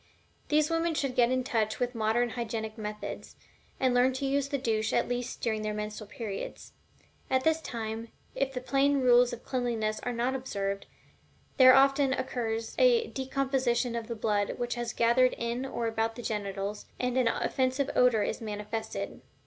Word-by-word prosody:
These 305 +1 +3
women 330 0 +1
should 275 -3 -1
get 240 -2 +4
in 255 0 +1
touch 220 -5 -1
with 245 0 -1
modern 230 +1 +1
hygienic 220 -2 -4
methods, 210 -1 -6 0.4
and 260 -1 +2
learn 250 +1 +4
to 260 +2 -3
use 280 0 0
the 280 - 0
douche 225 -4 0
at - - +2
least 245 0 -3
during 220 -2 0
their 215 0 -2
menstrual 210 0 -5
periods. 210 -3 -6 0.6
At 260 0 +2
this 320 +1 +2
time, 225 -3 -5 0.3
if 275 -1 -1
the 250 -1 -4
plain 275 +2 +2
rules 245 -1 +5
of 235 - -8
cleanliness 230 -4 -1
are 245 - -3
not 240 +2 0
observed, 200 -7 -3 0.7
there 255 -1 +9
often 275 0 +4
occurs 225 -4 -2
a 480 -2 +4
decomposition 260 -3 0
of 230 -1 -4
the 235 - -4
blood 210 -2 0
which 240 -1 -2
has 240 -1 -3
gathered 245 +2 +3
in 235 +3 -2
or 235 -3 -3
about 225 0 -1
the 240 - -8
genitals, 200 -1 -3
and 250 0 -1
an 255 -2 +3
offensive 260 +3 0
odor 245 -4 +4
is - - -3
manifested. 210 +1 -5
240 Hz, 175 wpm, -29 LUFS, 220-260 Hz, 0.7 s, there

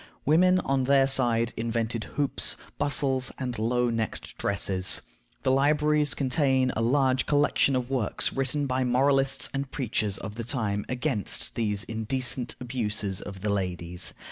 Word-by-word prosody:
Women, 180 +5 +4
on 135 -4 0
their 135 0 +4
side, 120 -4 +2
invented 115 -1 -2
hoops, 145 -1 +1 0.2
bustles, 135 -2 0
and 125 -4 -4
low 120 +2 +1
necked 115 -1 -4
dresses. 95 -2 +1 0.4
The 130 - +2
libraries 150 +1 +2
contain 130 -1 +1
a 115 - -1
large 130 +1 +2
collection 145 -1 +2
of 125 0 -2
works 125 -6 -1
written 135 +2 -1
by 130 -1 0
moralists 135 +2 +3
and 135 0 -3
preachers 110 -7 -2
of 105 +1 -8
the 115 - -3
time 110 -5 -2
against 125 - -2
these 105 -3 0
"indecent 120 +3 -1
abuses" 110 -6 -2
of 95 -2 -9
the 105 - -1
ladies. 90 -3 -2
125 Hz, 145 wpm, -27 LUFS, 110-135 Hz, 0.4 s, Women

